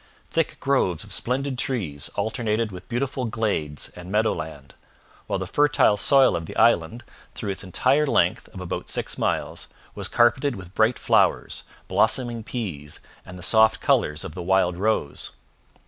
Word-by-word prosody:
Thick 165 -2 -1
groves 115 - +1
of 105 -2 -5
splendid 130 +4 -1
trees 90 - -2
alternated 110 +1 -1
with 90 +4 -10
beautiful 130 +1 -2
glades 100 -11 -2
and 90 +1 -11
meadow 110 +2 +2
land, 75 -3 -8 0.5
while - - -1
the - - -4
fertile 145 -7 +3
soil 135 +5 +4
of 85 -1 -4
the - - -8
island, 115 0 +3 0.3
through 105 -3 -3
its 95 - -5
entire 130 - +2
length - - +1
of - - -11
about 90 - -5
six - - -3
miles, - - -2 0.3
was - - -2
carpeted 130 +3 +2
with 90 -2 -10
bright 110 +4 +2
flowers, - - +1 0.2
blossoming 120 -3 +1
peas, 85 - -5 0.3
and 90 -1 -9
the 90 - -7
soft 110 +2 +4
colours 75 +1 +1
of - - -7
the 90 - -6
wild 90 0 +2
rose. 95 -6 -1
110 Hz, 160 wpm, -24 LUFS, 90-125 Hz, 0.5 s, soil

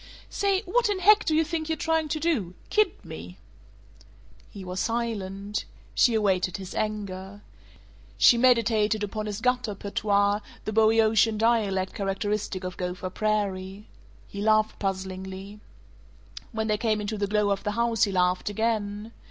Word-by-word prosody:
"Say 395 -1 +1
what 430 +4 +1
in 410 - 0
heck 415 +3 +5
do 315 - +1
you 320 - +4
think 320 0 -3
you're 320 - +1
trying 320 0 0
to 310 +1 -2
do? 255 - -1 0.2
Kid 420 -2 +1
me?" - - -9 1.1
He 195 -3 -9
was 180 +1 -4
silent. 210 -3 -2 0.3
She 240 -3 +4
awaited 190 -4 +1
his 190 -2 -8
anger. 205 -2 -4 0.7
She - - +7
meditated 225 -3 +3
upon 215 +1 -3
his 210 +1 -4
gutter 250 -3 0
patois, 200 0 +1 0.3
the 215 - -3
Boeotian 220 0 +4
dialect 210 -4 +1
characteristic 195 -1 -2
of 185 0 -5
Gopher 180 0 -4
Prairie. 200 -1 -2 0.4
He 200 - -7
laughed 215 0 +2
puzzlingly. 190 +1 -5 0.9
When 220 0 -2
they 215 -1 0
came 220 -2 +1
into 210 0 -4
the 200 - 0
glow 210 0 +1
of 195 - -1
the 210 -1 -1
house 235 -1 +2
he 200 - -3
laughed 180 +1 +1
again. 210 0 -2
210 Hz, 150 wpm, -26 LUFS, 195-230 Hz, 1.1 s, She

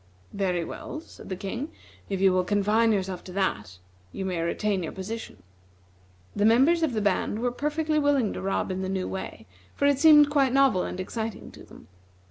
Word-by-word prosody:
"Very 180 -3 -1
well," 305 - -7
said 325 - -14
the 190 - -3
King, 230 - -5 0.4
"if 195 -2 -2
you 190 -1 +4
will 185 0 +2
confine 210 +4 +2
yourself 190 -3 -2
to 185 - -9
that, 105 - -2 0.3
you 190 - -5
may 180 -3 -2
retain 195 +3 -1
your 165 - -4
position." 190 - -7 0.9
The 205 - 0
members 265 +10 +4
of 315 -6 +1
the 215 - -1
band 205 +1 0
were 245 +2 -1
perfectly 305 +3 -1
willing 285 -7 +2
to - - -6
rob 195 0 -1
in 185 0 -3
the 190 - -3
new 190 -1 -2
way, 190 -11 -6 0.3
for - - 0
it 285 -1 +3
seemed 295 -1 +7
quite 275 -3 +2
novel 270 -9 +4
and - - -6
exciting 220 +3 -5
to - - -13
them. - - -16
210 Hz, 195 wpm, -26 LUFS, 190-275 Hz, 0.9 s, seemed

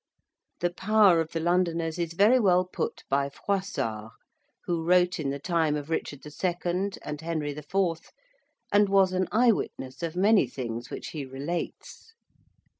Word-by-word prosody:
The 175 0 +1
power 195 -3 +4
of 160 - -5
the 165 - -2
Londoners 170 -1 0
is 170 -1 -2
very 210 +8 +5
well 185 -4 +3
put 180 - -4
by 140 +1 +1
Froissart, 125 - -3 0.5
who 170 -2 -1
wrote 180 +1 +3
in 145 -3 -1
the 140 - -2
time 160 0 0
of 150 +2 -5
Richard 145 -3 -3
II. 175 +4 -2
and 150 0 -5
Henry 160 -3 -2
IV., 150 +6 -6 0.9
and 205 -1 +4
was 195 -1 +4
an 185 -1 0
eyewitness 210 - +1
of 165 0 -3
many 200 - +4
things 120 -2 -5
which - - -6
he 150 -3 -5
relates. 145 - -6
170 Hz, 150 wpm, -27 LUFS, 150-185 Hz, 0.9 s, very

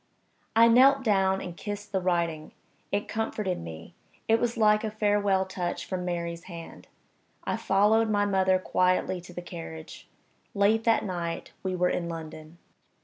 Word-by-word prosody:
I 230 +1 +7
knelt 265 +3 +6
down 195 -4 +2
and 175 -2 -7
kissed 205 +2 -6
the 190 -2 0
writing. 170 -4 -1 0.4
It 205 +1 -1
comforted 215 -4 -2
me 80 0 -9 0.3
it 225 0 +4
was 240 -1 -1
like 215 -1 +4
a 220 - -1
farewell 205 -2 +1
touch 185 -2 -4
from 185 -1 -4
Mary's 170 -1 -4
hand. 170 -3 -10 0.6
I - - -1
followed 215 +3 +3
my 205 -1 +2
mother 190 -2 +3
quietly 185 0 +1
to 180 - -13
the 175 0 -7
carriage. 80 - -9 0.5
Late 210 +3 +3
that 230 -1 +3
night 170 -3 -4
we 185 -1 -2
were 180 0 +2
in 170 -1 -2
London. 160 0 -8
190 Hz, 155 wpm, -27 LUFS, 175-210 Hz, 0.6 s, I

